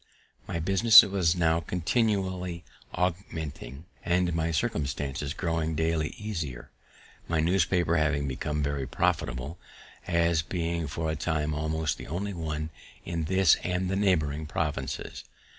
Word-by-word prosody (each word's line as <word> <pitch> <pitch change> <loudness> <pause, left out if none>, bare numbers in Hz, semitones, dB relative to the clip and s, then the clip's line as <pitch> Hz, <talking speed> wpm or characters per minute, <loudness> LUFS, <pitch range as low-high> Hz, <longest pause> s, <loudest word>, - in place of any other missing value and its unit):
My - - -3
business 95 +7 +8
was 95 -4 +1
now 80 -2 +2
continually 90 - -1 0.3
augmenting, 80 -6 -4 0.2
and 90 -1 +1
my 80 0 0
circumstances 75 - -2
growing 80 -2 -1
daily 80 -1 0
easier, 80 - -5 0.6
my 85 -1 0
newspaper 85 0 +2
having 75 -2 +1
become 75 +3 -2
very 70 -2 -2
profitable, 70 +3 -1 0.5
as 85 -1 +2
being 85 -1 -2
for 80 +3 -2
a - - -2
time 75 -1 -1
almost 80 0 -1
the - - -8
only 100 +5 -3
one 80 -2 -4 0.3
in 85 -2 -2
this 95 -1 +4
and 90 +1 -1
the - - 0
neighbouring 80 -7 +1
provinces. 70 -4 -3
80 Hz, 125 wpm, -28 LUFS, 75-90 Hz, 0.6 s, business